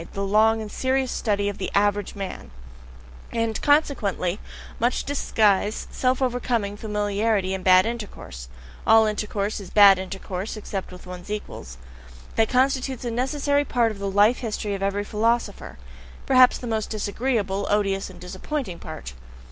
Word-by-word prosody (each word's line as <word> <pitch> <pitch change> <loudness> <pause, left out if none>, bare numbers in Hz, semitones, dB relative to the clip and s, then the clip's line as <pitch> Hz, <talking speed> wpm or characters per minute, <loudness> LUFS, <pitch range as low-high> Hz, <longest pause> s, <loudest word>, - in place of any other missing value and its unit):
The 200 0 -2
long 220 +2 +3
and 210 - -8
serious 260 0 0
study 205 -2 0
of 205 - -4
the 190 - -2
AVERAGE 205 0 +1
man 195 - -6 0.8
and 230 -1 -1
consequently 215 - +1 0.4
much 240 +2 +1
disguise, 215 -7 +1
self 255 +1 0
overcoming, 240 -5 -1
familiarity, 205 -1 0
and 190 -1 -4
bad 185 +1 +6
intercourse 205 - -6 0.4
(all 225 0 +7
intercourse 210 -1 -2
is 195 -3 -9
bad 200 -2 +7
intercourse 190 +2 -5
except 200 -3 -5
with 180 - -12
one's 180 +1 -9
equals): 135 - -6 0.6
that 220 -1 +2
constitutes 260 -1 +1
a 240 - -2
necessary 285 +4 0
part 240 -4 +1
of 205 - -9
the 200 0 -2
life 205 +5 +4
history 215 -3 -3
of 195 - -4
every 200 +1 0
philosopher; 230 +3 -1 0.5
perhaps 255 -2 +6
the - - -8
most 220 -2 -2
disagreeable, 205 -2 -1
odious, 195 -2 0
and - - -13
disappointing 190 - -5
part. 155 - -8
210 Hz, 150 wpm, -24 LUFS, 195-240 Hz, 0.8 s, all